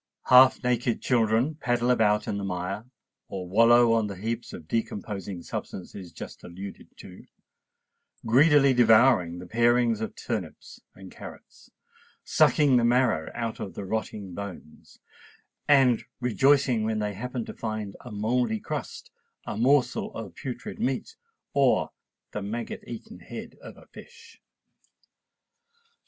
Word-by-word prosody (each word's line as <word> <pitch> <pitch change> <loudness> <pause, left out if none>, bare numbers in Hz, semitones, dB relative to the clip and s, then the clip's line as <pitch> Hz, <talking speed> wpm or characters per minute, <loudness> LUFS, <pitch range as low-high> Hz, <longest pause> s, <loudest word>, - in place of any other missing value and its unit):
Half 130 +1 +7
naked 120 -1 0
children 115 +4 +1
paddle 120 -4 0
about 105 -3 +2
in 100 - -2
the - - -5
mire 95 +3 -4 0.4
or 95 -2 -6
wallow 115 +4 +5
on 115 -2 +1
the 100 - -6
heaps 115 +5 -4
of 80 - -10
decomposing 100 -4 -4
substances 90 -1 -7
just - - -10
alluded 95 +3 -9
to,—greedily 140 +3 -1
devouring 115 -7 +4
the 90 - -8
parings 120 +2 +2
of 110 - -4
turnips 105 -10 -6
and 95 -1 -12
carrots, - - -13 0.5
sucking 145 -4 +4
the 120 - +2
marrow 120 -9 +2
out 115 -2 -4
of 95 - -6
the 100 - -6
rotting 105 -2 -4
bones, 95 -5 -10 0.7
and 130 -5 +4 0.2
rejoicing 130 -1 +3
when 110 0 -1
they 105 -1 -2
happen 120 +3 -5
to - - -8
find 110 -3 -5
a 125 - -10
mouldy 110 +2 0
crust, - - -6 0.3
a - - -4
morsel 130 +4 +2
of 105 -6 -7
putrid 125 -3 -7
meat, 130 0 -2 0.4
or 140 -2 +2 0.4
the 105 - -4
maggot 110 +4 -5
eaten 215 - -9
head - - -9
of - - -11
a - - -16
fish. - - -15
115 Hz, 130 wpm, -26 LUFS, 100-125 Hz, 0.7 s, Half